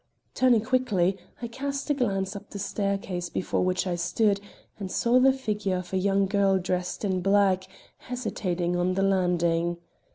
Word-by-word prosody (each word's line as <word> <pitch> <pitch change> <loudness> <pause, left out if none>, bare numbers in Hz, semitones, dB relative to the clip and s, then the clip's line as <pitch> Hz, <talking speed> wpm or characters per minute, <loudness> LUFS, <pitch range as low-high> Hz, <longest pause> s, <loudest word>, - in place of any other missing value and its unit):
Turning 250 -3 +4
quickly, 215 -7 +1 0.3
I - - -1
cast 280 +4 -3
a - - +5
glance 195 -8 -1
up 200 0 -9
the - - -7
staircase 195 -3 -2
before 185 - -1
which 185 0 0
I 180 -2 -1
stood 200 +4 +1 0.4
and 190 -2 -5
saw 240 +5 +3
the 265 +1 +6
figure 210 -7 -2
of 180 +1 -7
a - - +2
young 195 +1 +2
girl 195 -1 +2
dressed 180 +2 -2
in 185 -2 0
black 195 -1 +3 0.3
hesitating 185 -8 -2
on 180 +1 +1
the 195 - +1
landing. 175 -3 +1
195 Hz, 165 wpm, -27 LUFS, 180-215 Hz, 0.4 s, the